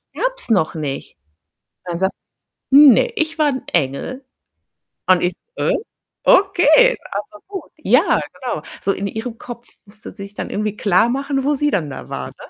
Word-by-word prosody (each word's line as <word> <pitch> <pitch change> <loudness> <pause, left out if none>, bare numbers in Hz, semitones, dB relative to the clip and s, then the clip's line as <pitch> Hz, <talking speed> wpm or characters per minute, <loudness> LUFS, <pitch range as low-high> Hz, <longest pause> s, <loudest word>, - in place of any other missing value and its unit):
gab's - - -2
noch 185 -9 +2
nicht. 145 - -5 0.7
Dann 175 -2 -4
sagt 190 +1 +1 0.6
„Ne, 285 - +7
ich 315 -2 -1
war 305 -1 +3
'n 260 -3 -2
Engel.“ 170 - -2 0.8
Und 185 -1 +4
ich: 175 +1 0 0.2
„Hä? - - +1 0.5
Okay, 405 +6 +5
also 205 +1 -6
gut.“ 390 -3 -7
Ja, 300 - +3
genau. - - -5 0.2
So 195 - 0
in 195 - -4
ihrem 225 +2 -6
Kopf 240 0 -9 0.2
musste 210 +2 -11
sie 200 - -9
sich 200 +1 -11
dann - - -5
irgendwie 210 0 -2
klarmachen, 260 +8 +1
wo 295 +1 +2
sie 295 +1 +1
dann 165 - -1
da 130 - -8
war, 65 -1 -5
ne? - - -14
230 Hz, 165 wpm, -19 LUFS, 190-295 Hz, 0.8 s, Ne